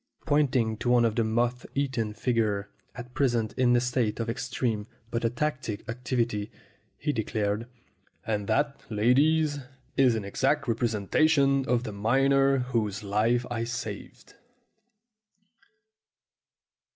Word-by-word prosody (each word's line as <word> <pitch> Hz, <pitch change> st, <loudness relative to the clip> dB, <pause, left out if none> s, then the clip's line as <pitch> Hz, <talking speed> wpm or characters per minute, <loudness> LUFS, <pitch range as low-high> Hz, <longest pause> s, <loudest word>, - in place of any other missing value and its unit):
Pointing 130 Hz, -7 st, +2 dB
to 120 Hz, -, -2 dB
one 120 Hz, -1 st, +5 dB
of 110 Hz, -2 st, 0 dB
the 115 Hz, -, +2 dB
moth 120 Hz, +2 st, 0 dB
eaten 125 Hz, -6 st, -1 dB
figures, 110 Hz, -5 st, 0 dB, 0.3 s
at 125 Hz, 0 st, -9 dB
present 120 Hz, -6 st, +1 dB
in 125 Hz, -1 st, +3 dB
a -, -, +5 dB
state 125 Hz, -3 st, -1 dB
of 115 Hz, 0 st, -1 dB
extreme 120 Hz, -3 st, -2 dB, 0.2 s
but 115 Hz, -, -1 dB
ataxic 120 Hz, -3 st, -2 dB
activity, 120 Hz, -3 st, -2 dB, 0.5 s
he 150 Hz, -1 st, -1 dB
declared, 110 Hz, 0 st, -2 dB, 0.6 s
"And 105 Hz, -2 st, -2 dB
that, 140 Hz, +5 st, 0 dB
ladies, 145 Hz, +7 st, +3 dB, 0.4 s
is 130 Hz, -4 st, +5 dB
an 110 Hz, -3 st, -3 dB
exact 140 Hz, +8 st, 0 dB
representation 135 Hz, +5 st, +2 dB
of 120 Hz, -1 st, +2 dB
the 110 Hz, -, -5 dB
miner 135 Hz, +6 st, +3 dB, 0.2 s
whose 105 Hz, -3 st, -1 dB
life 110 Hz, +4 st, +1 dB
I 115 Hz, -1 st, -1 dB
saved!" 115 Hz, +1 st, -6 dB
120 Hz, 120 wpm, -27 LUFS, 110-135 Hz, 0.6 s, one